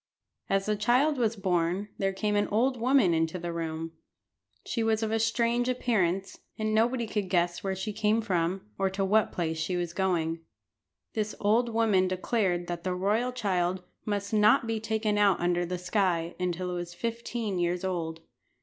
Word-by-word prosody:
As 195 0 +1
the 215 - +1
child 255 +7 +2
was 230 -2 +1
born 185 0 0
there 195 0 +1
came 210 +2 -1
an 205 0 +2
old 245 +5 +2
woman 245 -8 +4
into 165 +2 0
the 170 -1 -4
room. 165 -1 -4 0.7
She 230 - -2
was 225 0 +1
of 220 - -1
a 225 - +1
strange 235 +2 +1
appearance, 195 -7 0 0.2
and 215 0 -1
nobody 235 +2 +2
could 210 -3 -2
guess 175 -1 +1
where 190 -1 -1
she 205 +3 -4
came 215 +1 +2
from, 185 -3 -1
or 195 - +2
to 195 +1 -1
what 210 +2 +3
place 160 -2 -2
she 180 +3 -1
was 175 -1 -3
going. 170 -4 0 0.7
This 215 -1 -2
old 225 +4 +2
woman 215 -5 +3
declared 185 -1 0
that 175 -1 -5
the 185 -1 -1
royal 210 +7 +1
child 185 -6 -1 0.2
must 205 0 -3
not 215 +4 +5
be 225 -1 -1
taken 215 -1 0
out 200 -2 +4
under 175 0 +1
the 180 +1 -2
sky 180 -2 0
until 180 0 -2
it 180 - -3
was 175 0 -6
fifteen 230 -3 -3
years 175 +1 0
old. 165 -3 -3
195 Hz, 180 wpm, -28 LUFS, 175-220 Hz, 0.7 s, not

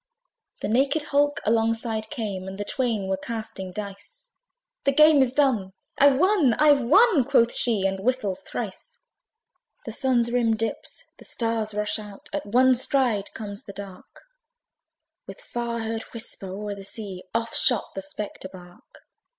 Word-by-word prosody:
The - - 0
naked 275 +7 +2
hulk 290 0 +1
alongside 225 0 0
came, 200 -6 -4
And 190 0 -7
the 205 - -4
twain 225 -5 -1
were 190 0 0
casting 220 -3 -6
dice; 200 - -9 0.5
"The 275 - +3
game 305 0 +6
is 260 -2 +3
done! 250 -9 +1 0.3
I've 280 -1 +6
won! 335 - +4
I've 295 -2 +5
won!" 340 - +5
Quoth 240 -3 +3
she, 220 -5 +1
and 195 0 0
whistles 210 -3 -1
thrice. - - -7 0.9
The - - -5
Sun's 245 -4 +1
rim 235 -2 +2
dips; 225 +1 -4 0.2
the - - -13
stars 225 -2 -2
rush 210 +1 -1
out: 205 -2 -11
At - - -3
one 255 +4 +5
stride 245 -5 +1
comes 205 -2 -7
the 200 - -9
dark; 195 -1 -10 1.1
With - - -9
far 235 - -4
heard 225 0 -3
whisper, 225 -3 -6
o'er 205 +2 -5
the 200 -1 -9
sea. 195 -2 -6
Off 230 0 -1
shot 245 -5 +2
the 195 - -4
spectre 195 0 -6
bark. 175 -2 -15
225 Hz, 155 wpm, -25 LUFS, 200-260 Hz, 1.1 s, game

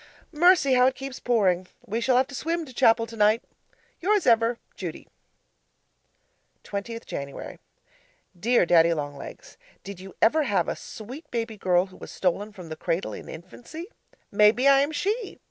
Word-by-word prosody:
Mercy! 335 -3 +5
how 250 0 +5
it 260 - 0
keeps 270 -1 -7
Pouring. 185 -7 +1 0.2
We 225 +3 -2
shall 255 0 +3
have 260 - +4
to - - -10
swim 330 +4 -2
to 260 - -13
chapel 230 -2 +4
tonight. 220 0 +2 0.6
Yours 410 +3 +2
ever, 230 0 +3 0.2
Judy 175 -4 -7 1.6
20th 230 +3 -6
Jan. 140 0 -7 0.8
Dear 235 +1 +3
Daddy 170 -1 +5
Long 145 -2 -4
Legs, 140 - -11 0.3
Did 200 -2 -8
you 190 +1 -11
ever 310 +8 +4
have 205 -9 +1
a - - -2
sweet 260 +9 -10
baby 230 -2 -3
girl 180 -3 +2
who 190 -1 -16
was - - -10
stolen 195 +3 -1
from 180 -5 -11
the 155 - -5
cradle 170 +2 -2
in - - -9
infancy? 280 - -10 0.4
Maybe 210 +6 +4
I 275 -1 +7
am 285 +2 +1
she! 400 +9 -2
230 Hz, 165 wpm, -26 LUFS, 190-270 Hz, 1.6 s, I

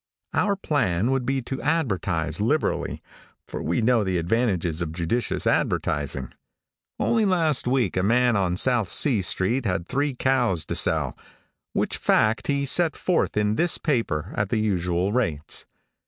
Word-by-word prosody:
Our 205 -1 +1
plan 125 - 0
would 135 -2 -1
be 135 -1 0
to 135 +2 -5
advertise 95 - -1
liberally, 145 +9 -1 0.4
for - - -6
we 85 +8 -1
know 120 -1 +3
the 95 -2 -1
advantages 90 -3 0
of 80 -2 -3
judicious 90 +8 -1
advertising. 70 -3 -1 0.7
Only 225 -2 +2
last 165 -9 +1
week 125 -7 +1
a 95 - +1
man 120 +4 +3
on 90 -3 0
South 120 -4 +2
C 120 - +3
street 100 +7 0
had 90 -2 -2
three 140 0 -1
cows 120 -10 +1
to - - -3
sell, - - +1 0.6
which - - -1
fact 110 -1 +1
he 140 -1 0
set 165 +3 +3
forth 180 -11 0
in 105 0 +1
this 175 0 +2
paper 115 - -1
at 105 -1 -1
the 115 - 0
usual 90 -2 0
rates. 85 -12 -1
110 Hz, 155 wpm, -24 LUFS, 90-135 Hz, 0.7 s, know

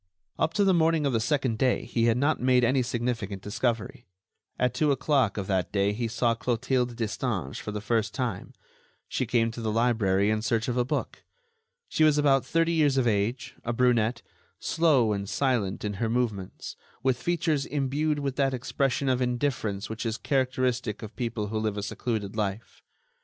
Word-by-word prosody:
Up 160 - 0
to 205 - +3
the 195 -1 +4
morning 165 -2 +3
of 140 - +1
the 115 - +2
second 130 -2 0
day 130 -2 +2
he 115 -1 0
had 115 0 +3
not 145 +4 +1
made 125 -1 +4
any 130 +2 +3
significant 115 -5 -3
discovery. 115 +1 -2 0.5
At 125 -1 +1
two 150 -2 +2
o'clock 135 -6 +1
of 100 - -2
that 95 -2 -1
day 100 0 +1
he 115 +2 -2
saw 115 +1 +1
Clotilde 125 +1 -1
Destange 110 - -3
for 105 - -5
the 105 0 -4
first 110 -1 0
time; 120 -8 -4 0.5
she - - -2
came 115 -1 +2
to 115 - -7
the 110 -1 -1
library 105 -4 +2
in 110 0 0
search 115 0 0
of 125 - -1
a 125 - +2
book. 125 - -3 0.7
She 155 - +1
was 155 -1 +5
about 140 -3 +4
thirty 165 0 +1
years 150 -5 +3
of 130 - +3
age, 110 +3 -1
a 120 - -2
brunette, 120 -1 +2 0.3
slow 145 -10 +2
and 100 -1 -4
silent 120 -9 0
in 105 - -2
her 115 - +1
movements, 110 -6 -2 0.3
with 130 -2 +1
features 160 -3 0
imbued 145 +2 0
with 140 -2 -3
that 135 -2 +2
expression 135 +2 -1
of 130 -1 +2
indifference 125 -5 -1
which 110 0 -5
is 115 -1 -2
characteristic 130 -5 -1
of 110 0 -8
people 115 -4 -3
who 110 0 -1
live 110 -1 -1
a 100 - -3
secluded 105 -1 -3
life. 105 0 -4
120 Hz, 185 wpm, -27 LUFS, 110-135 Hz, 0.7 s, was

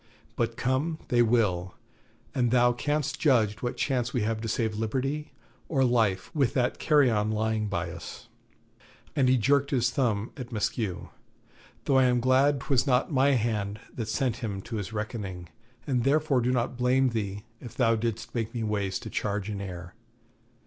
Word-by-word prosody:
But - - -1
come 140 +6 0
they 120 -1 +4
will, 105 -6 +1 0.6
and 125 -2 +1
thou 120 0 +4
canst 145 +3 -1
judge 115 -8 +2
what 120 - -3
chance 125 -3 0
we 120 - +1
have 110 0 -1
to 115 - -3
save 110 0 0
liberty 135 +7 -2 0.4
or 135 -5 +2
life 110 -7 +1
with 140 -6 +1
that 125 -2 +1
carrion 120 -9 +3
lying 110 0 0
by 90 -3 -2
us' 85 -1 -9 0.9
and 130 -3 +3
he 130 - +5
jerked 140 +4 +2
his 125 -4 +1
thumb 115 -4 0
at 125 -2 -8
Maskew 105 -4 -2 0.8
'though 135 - +3
I 130 - +5
am 125 -1 +3
glad 130 +3 +3
'twas 130 -2 +1
not 130 +4 +2
my 140 +1 +4
hand 105 -4 -1
that 115 -3 -4
sent 125 -1 0
him 105 -6 -4
to 115 -2 -5
his 100 0 -4
reckoning, 105 -5 -5 0.4
and 125 -4 0
therefore 140 -1 +2
do 125 +2 +1
not 125 0 -1
blame 130 +1 +3
thee 105 -3 -3 0.2
if 120 - -10
thou 115 -3 +3
didst 115 0 -3
make 115 -1 -3
me 115 - -2
waste 100 -3 -2
a - - -5
charge 105 0 -2
in 100 -1 -4
air. 90 -2 -7
120 Hz, 175 wpm, -28 LUFS, 105-130 Hz, 0.9 s, he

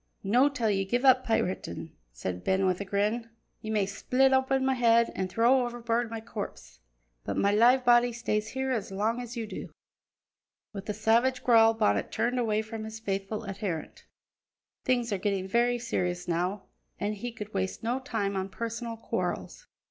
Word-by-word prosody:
"No' 245 +8 +4
till 235 -6 0
ye 195 -1 +1
give 245 +7 -1
up 260 -1 +6
piratin'," 220 - -2 0.2
said 90 +9 -5
Ben 190 0 +2
with 185 0 +1
a - - -3
grin. 210 +4 -1 0.3
"Ye 215 - -6
may 210 -2 +1
split 255 +7 +2
open 265 0 +2
my 265 - +3
head, 235 -2 +4
an' 190 - -2
throw 240 +6 +3
overboard 240 -1 -1
my 225 0 -5
corpse, 220 -2 -8 0.4
but - - -3
my 200 - +3
live 245 +5 +5
body 240 0 +5
stays 220 -2 -2
here 265 0 -2
as 220 -6 -2
long 220 +5 0
as 240 0 -7
ye 230 - -2
do." 215 - -7 1.0
With 200 +1 -7
a 210 - -1
savage 235 +5 +2
growl 225 -2 +6
Bonnet 100 - +1
turned 240 +3 0
away 220 -2 +1
from 220 0 -6
his 220 0 -7
faithful 200 +1 -3
adherent. 195 -5 -5 0.8
Things 245 -3 +1
were 200 - 0
getting 195 -1 -1
very 240 +4 +2
serious 180 -7 -2
now 180 +4 -1 0.4
and 205 +1 -1
he 240 +4 -5
could 215 -2 -8
waste 190 +1 -2
no 240 +3 0
time 220 -7 -2
on 190 0 -2
personal 230 +1 -5
quarrels. - - -4
225 Hz, 180 wpm, -28 LUFS, 200-240 Hz, 1.0 s, up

